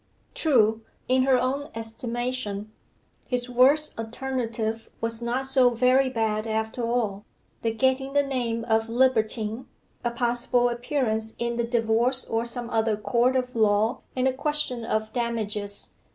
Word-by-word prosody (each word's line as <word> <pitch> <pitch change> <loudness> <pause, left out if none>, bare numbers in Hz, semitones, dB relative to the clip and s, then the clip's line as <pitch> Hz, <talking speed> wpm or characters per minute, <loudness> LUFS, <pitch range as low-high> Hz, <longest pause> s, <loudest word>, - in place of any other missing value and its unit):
True, 225 -8 +3 0.3
in 255 0 +3
her 265 -1 +4
own 275 +4 -2
estimation, 225 -2 -4 0.6
his 250 -1 -1
worst 275 +3 +4
alternative 225 -2 -3
was 230 0 -1
not 245 +3 -1
so 265 -2 +5
very 255 +2 +3
bad 220 -3 -1
after 220 +2 -2
all 230 -4 -1 0.4
the 230 - 0
getting 260 +3 0
the 285 0 +3
name 240 -4 -2
of 225 -1 +1
libertine, 230 -1 +1 0.4
a 240 - +1
possible 240 +1 +1
appearance 240 -3 -2
in 235 0 -2
the 235 - +1
divorce 235 +2 +3
or 225 +1 -1
some 240 0 -1
other 220 -1 +1
court 240 +4 +1
of 250 -1 -1
law, 215 +2 +2
and 255 0 +1
a 260 - +1
question 285 -3 +1
of 220 -1 -2
damages. 210 -4 -3
235 Hz, 140 wpm, -25 LUFS, 225-255 Hz, 0.6 s, so